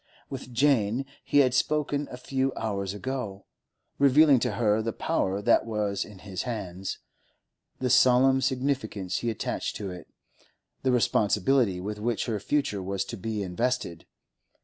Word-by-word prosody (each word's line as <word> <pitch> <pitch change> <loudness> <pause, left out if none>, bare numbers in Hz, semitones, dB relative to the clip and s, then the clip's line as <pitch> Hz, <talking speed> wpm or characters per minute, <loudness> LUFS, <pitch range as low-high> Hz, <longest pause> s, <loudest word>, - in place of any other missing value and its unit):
With 130 -2 -7
Jane 125 -2 +2 0.2
he 145 - +4
had 125 - 0
spoken 145 0 0
a 125 - -8
few 135 +1 -1
hours 100 -3 -3
ago, 110 -4 -5 0.5
revealing 140 0 +6
to 110 - -1
her 105 0 +2
the 115 +1 -2
power 95 +2 -1
that 120 - +4
was 105 -3 -1
in 105 - -12
his 95 -3 -4
hands, 95 -6 -4 0.8
the 130 - -1
solemn 130 +1 +5
significance 130 -7 -1
he 120 - -1
attached 110 -1 -3
to 100 -3 -5
it, 90 -2 -9 0.7
the 130 - +1
responsibility 110 -2 +2
with 105 +3 -5
which 110 -2 -1
her 110 -4 -2
future 105 -3 -1
was 95 +1 -2
to - - -6
be 110 0 -3
invested. 95 -2 -2
115 Hz, 150 wpm, -27 LUFS, 100-130 Hz, 0.8 s, revealing